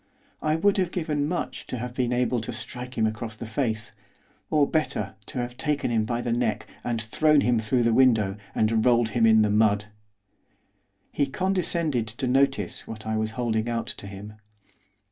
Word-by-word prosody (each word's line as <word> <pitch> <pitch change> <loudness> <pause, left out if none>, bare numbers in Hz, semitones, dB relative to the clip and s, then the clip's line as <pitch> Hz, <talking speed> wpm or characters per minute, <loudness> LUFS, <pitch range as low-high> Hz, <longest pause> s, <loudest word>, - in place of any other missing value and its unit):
I 155 0 +1
would 200 +5 +2
have 185 -3 +1
given 150 -4 -1
much 175 +2 -3
to 125 - -4
have 125 +1 -5
been 125 -1 0
able 125 -1 +1
to 110 - -4
strike 125 0 -7
him 110 - +3
across 110 0 -3
the 110 - -7
face, 110 -1 -2 0.6
or, 150 -2 +3
better, 105 -11 -1
to - - -7
have 125 0 -3
taken 150 -5 -1
him 110 -2 +2
by 120 +1 -1
the 120 - -2
neck, 115 -2 0 0.2
and 120 -2 -1
thrown 150 +7 +3
him 120 -2 +2
through 120 +3 +1
the 115 0 +3
window, 110 -6 +4 0.2
and 110 0 +2
rolled 120 -2 +4
him 115 +1 +3
in 110 -1 +6
the 105 - +1
mud. 105 0 +2 1.2
He 145 - +1
condescended 170 - 0
to 120 +5 -4
notice 125 -7 +1
what 110 -1 -8
I 110 0 -1
was 110 0 -1
holding 115 -2 0
out 115 -1 -1
to 100 - -7
him. 100 +2 -9
120 Hz, 185 wpm, -26 LUFS, 110-135 Hz, 1.2 s, in